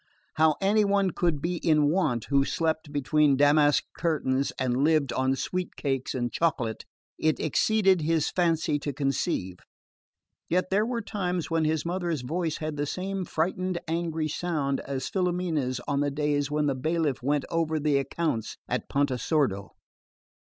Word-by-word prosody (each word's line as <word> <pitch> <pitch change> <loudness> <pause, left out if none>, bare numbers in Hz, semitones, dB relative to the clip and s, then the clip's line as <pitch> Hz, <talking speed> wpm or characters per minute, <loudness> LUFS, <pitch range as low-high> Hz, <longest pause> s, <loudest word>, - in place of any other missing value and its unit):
How 155 -1 +3
any 210 +2 +3
one 200 -2 +2
could 165 -5 -1
be 175 +1 -1
in 155 -3 +3
want, 130 - 0
who 140 -1 +4
slept 160 +1 -1
between 145 0 +2
damask 145 +1 +4
curtains 140 -5 0
and 130 +1 0
lived 150 -5 +2
on 130 +1 +1
sweet 180 +6 -3
cakes 135 -2 -2
and 120 -1 -2
chocolate, 130 -10 -1 0.3
it 155 -1 +1
exceeded 190 +3 +2
his 160 0 +1
fancy 165 -4 +1
to 145 0 -4
conceive; 135 - -1 0.9
yet 185 +2 0
there 210 +3 +2
were 235 -2 -2
times 180 -5 -3
when 165 -1 +2
his 155 0 0
mother's 170 -4 -2
voice 160 +4 -2
had 155 -1 -4
the 145 0 -1
same 190 +3 -3
frightened 180 +3 -1
angry 165 -1 -1
sound 150 -4 -1
as 135 -2 -4
Filomena's 175 -9 -1
on 140 -1 0
the 145 0 +1
days 145 0 0
when 150 0 0
the 140 - +1
bailiff 155 +1 -1
went 145 +2 0
over 160 -1 0
the 145 -1 +2
accounts 140 -4 -2
at - - -3
Pontesordo. 135 - 0
155 Hz, 155 wpm, -27 LUFS, 140-170 Hz, 0.9 s, who